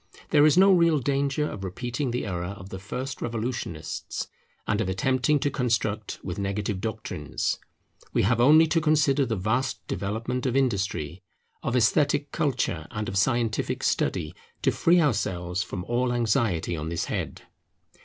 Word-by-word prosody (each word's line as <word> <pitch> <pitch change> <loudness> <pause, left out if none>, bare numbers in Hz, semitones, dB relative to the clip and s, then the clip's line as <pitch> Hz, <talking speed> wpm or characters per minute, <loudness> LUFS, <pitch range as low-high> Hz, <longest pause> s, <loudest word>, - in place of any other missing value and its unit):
There 150 0 +6
is 155 - +3
no 195 +1 +7
real 170 -3 +4
danger 140 +2 0
of 95 - -6
repeating 120 +8 -3
the 120 0 -2
error 90 0 -3
of 95 +1 -10
the 95 - -6
first 130 +7 -5
revolutionists 115 -9 -4 0.4
and 105 0 +1
of 100 - -1
attempting 130 +9 +2
to 145 - +1
construct 110 -5 -1
with 90 +1 -4
negative 100 0 -2
doctrines. 110 0 -3 0.5
We - - +2
have 115 +3 +2
only 155 +6 +7
to 165 +1 +1
consider 150 -3 +3
the 115 - 0
vast 110 +7 -1
development 115 +7 -2
of 125 - -1
industry, 95 - 0 0.4
of 120 - -1
esthetic 145 +4 +2
culture, 120 - -1
and 105 0 -4
of 95 - -4
scientific 115 +2 +1
study, 75 +2 0 0.3
to - - +4
free 175 +1 +4
ourselves 100 - 0
from 90 -3 -4
all 120 +4 0
anxiety 115 -8 +1
on 80 0 -4
this 85 0 -2
head. - - -4
115 Hz, 155 wpm, -26 LUFS, 95-135 Hz, 0.5 s, no